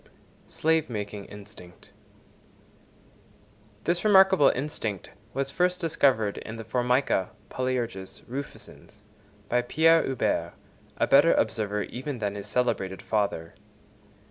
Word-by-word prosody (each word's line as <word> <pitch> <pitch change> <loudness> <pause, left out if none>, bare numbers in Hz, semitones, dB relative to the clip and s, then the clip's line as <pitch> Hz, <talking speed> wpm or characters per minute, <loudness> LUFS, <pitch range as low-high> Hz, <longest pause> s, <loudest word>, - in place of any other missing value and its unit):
Slave 160 -2 +1
making 105 -3 -5
instinct.—This 105 - -11
remarkable 190 -7 +6
instinct 115 - -4 0.2
was 135 0 -1
first 180 +2 +1
discovered 135 - +1
in 115 - -8
the 115 - -7
Formica 125 -3 +1 0.2
(Polyerges) 120 -7 -3
rufescens 130 -5 -9 0.5
by 120 +3 +2
Pierre 160 +6 +4
Huber, 135 -2 -1 0.4
a - - +2
better 145 +4 +5
observer 105 -2 0
even 130 +2 -5
than 105 -3 -2
his 100 0 -7
celebrated 100 -5 -1
father. 100 -6 -1
120 Hz, 100 wpm, -27 LUFS, 105-145 Hz, 0.5 s, remarkable